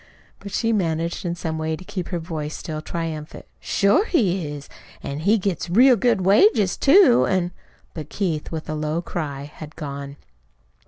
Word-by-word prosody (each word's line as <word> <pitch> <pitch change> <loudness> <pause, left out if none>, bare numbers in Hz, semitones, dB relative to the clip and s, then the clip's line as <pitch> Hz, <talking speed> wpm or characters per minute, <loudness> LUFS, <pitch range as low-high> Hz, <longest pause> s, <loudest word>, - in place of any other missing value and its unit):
But 200 0 -9
she 230 +3 0
managed 170 -3 -1
in 170 0 -1
some 160 -2 -4
way 160 0 -1
to 185 - -11
keep 190 -3 -5
her 175 - -3
voice 160 -3 -5
still 155 -1 -5
triumphant. 160 -2 -5
"Sure 205 - +2
he 190 - +1
is! 145 -1 -7 0.4
An' 140 +1 -4
he 200 +8 +3
gets 190 -4 -2
real 250 +8 +6
good 230 -2 +2
wages, 200 - +4
too, 280 -4 +5
an' 180 -2 0 0.2
" - - -34
But 155 -3 -7
Keith 170 -7 -2
with 160 -1 -5
a 155 - -3
low 155 +2 -2
cry 145 -6 -4
had 150 +1 -11
gone. 140 -1 -6
170 Hz, 175 wpm, -22 LUFS, 155-200 Hz, 0.4 s, real